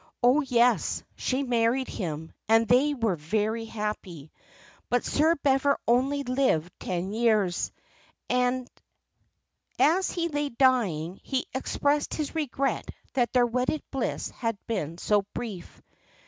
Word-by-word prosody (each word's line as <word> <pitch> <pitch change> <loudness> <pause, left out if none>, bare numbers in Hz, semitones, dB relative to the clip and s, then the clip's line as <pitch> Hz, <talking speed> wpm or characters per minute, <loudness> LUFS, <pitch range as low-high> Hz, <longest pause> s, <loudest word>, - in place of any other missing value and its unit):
"Oh, 255 +5 +5
yes, 245 -3 +2
she 265 +2 -1
married 245 +1 +1
him, 160 -4 -5 0.2
and 225 0 +5
they 275 +6 +4
were 225 -7 0
very 215 +8 -1
happy; 210 -9 -5 0.6
but 245 0 +1
Sir 320 +3 +3
Bever 280 0 +3
only 270 +4 +2
lived 250 - +1
ten 185 +1 -3
years. 215 -6 +1 0.6
As 255 +7 -2
he 340 -1 -1
lay 290 -2 -2
dying 215 - +1
he 265 -2 -2
expressed 285 +2 0
his 305 -3 -3
regret 275 -3 -1 0.2
that 245 -3 +1
their 250 -1 +4
wedded 250 +5 -1
bliss 270 -3 -2
had 230 -3 -3
been 165 -8 -3
so 205 +3 +2
brief. 210 -8 -7
245 Hz, 120 wpm, -27 LUFS, 210-270 Hz, 0.6 s, Oh